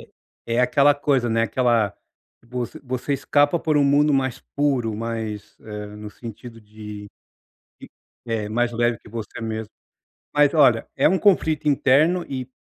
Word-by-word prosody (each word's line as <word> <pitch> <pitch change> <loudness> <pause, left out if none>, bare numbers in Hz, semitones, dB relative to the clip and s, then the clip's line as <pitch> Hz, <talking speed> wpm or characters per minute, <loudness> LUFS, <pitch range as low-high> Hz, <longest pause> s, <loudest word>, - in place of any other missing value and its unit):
é - - -15 0.4
é 115 +1 +1
aquela 140 +3 +4
coisa, 135 -4 +1
né. 115 0 +1
Aquela 115 -3 +1 0.5
você 125 +5 -5
você 130 +1 -3
escapa 145 +3 +2
por 155 -2 0
um 145 - +4
mundo 145 +1 +3
mais 130 -1 -1 0.2
puro, 130 -7 0
mais 110 -2 -5
eh, 105 -1 -7
no 105 0 -8
sentido 115 +1 -10
de 105 -1 -10 0.7
de - - -12 0.4
é, 110 -2 -2
mais 120 +2 0
leve 120 0 0
que - - -17
você 110 0 -7
mesmo 110 -1 -4 0.6
mas, 145 +1 +4
olha, 130 -7 +4
é 140 - +4
um 190 +3 +2
conflito 160 -7 +2
interno 155 +6 +3
e 130 -2 -5
120 Hz, 155 wpm, -22 LUFS, 115-145 Hz, 0.7 s, aquela